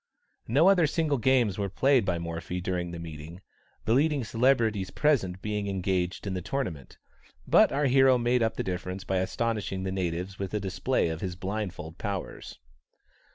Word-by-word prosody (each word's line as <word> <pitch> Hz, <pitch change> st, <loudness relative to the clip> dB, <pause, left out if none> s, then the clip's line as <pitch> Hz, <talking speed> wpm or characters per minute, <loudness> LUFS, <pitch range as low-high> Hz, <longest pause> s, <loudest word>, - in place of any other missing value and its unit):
No 145 Hz, +10 st, +4 dB
other 180 Hz, -5 st, +5 dB
single 150 Hz, -2 st, 0 dB
games 120 Hz, -5 st, +2 dB
were 100 Hz, -1 st, -1 dB
played 130 Hz, +3 st, +3 dB
by 90 Hz, -3 st, 0 dB
Morphy 85 Hz, +1 st, -4 dB
during 90 Hz, -1 st, -2 dB
the 85 Hz, -, -6 dB
meeting, 80 Hz, +1 st, -8 dB, 0.5 s
the 110 Hz, -, +2 dB
leading 145 Hz, +1 st, +2 dB
celebrities 115 Hz, -5 st, +1 dB
present 100 Hz, -12 st, +1 dB
being 105 Hz, -1 st, -2 dB
engaged 95 Hz, -2 st, -1 dB
in 100 Hz, -, -2 dB
the 90 Hz, -, -3 dB
tournament, 90 Hz, -, -4 dB, 0.5 s
but -, -, +5 dB
our 145 Hz, +1 st, +1 dB
hero 135 Hz, -1 st, +5 dB
made 120 Hz, +1 st, +1 dB
up 110 Hz, -1 st, +1 dB
the -, -, -2 dB
difference 90 Hz, +1 st, -4 dB
by 95 Hz, -, -1 dB
astonishing 95 Hz, 0 st, -2 dB
the 95 Hz, -, -2 dB
natives 90 Hz, 0 st, -3 dB
with 100 Hz, +1 st, -3 dB
a -, -, +1 dB
display 95 Hz, +2 st, 0 dB
of 80 Hz, 0 st, -5 dB
his 90 Hz, -2 st, -3 dB
blindfold 95 Hz, -4 st, -5 dB
powers. 100 Hz, -, -5 dB
100 Hz, 170 wpm, -28 LUFS, 90-125 Hz, 0.5 s, other